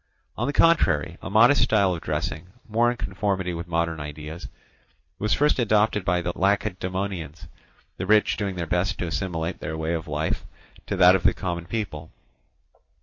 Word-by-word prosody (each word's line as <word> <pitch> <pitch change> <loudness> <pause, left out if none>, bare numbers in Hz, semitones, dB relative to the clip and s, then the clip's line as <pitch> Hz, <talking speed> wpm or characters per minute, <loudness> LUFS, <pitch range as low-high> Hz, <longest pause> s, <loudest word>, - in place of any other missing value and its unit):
On - - -2
the - - +1
contrary, 90 - +3
a - - -6
modest 115 +7 +5
style 105 -6 +3
of 85 - -5
dressing, 75 +2 -3 0.2
more 115 +2 +2
in 120 - -3
conformity 95 0 -2
with 85 +1 -6
modern 85 -1 -1
ideas, 75 +3 -7 0.7
was 105 +1 +1
first 150 -1 +2
adopted 105 -3 +2
by 90 0 +1
the 90 - -2
Lacedaemonians, 95 -4 -2 0.5
the 95 - -4
rich 105 +1 +4
doing 100 -3 -3
their 85 -2 -3
best 90 +4 0
to - - -3
assimilate 85 -1 -3
their 80 - -4
way 80 +1 -2
of 85 0 -3
life 75 +1 -2 0.4
to 100 - -1
that 90 0 +7
of 95 - 0
the - - +3
common 85 -2 -4
people. 90 -8 -4
90 Hz, 170 wpm, -25 LUFS, 80-105 Hz, 0.7 s, that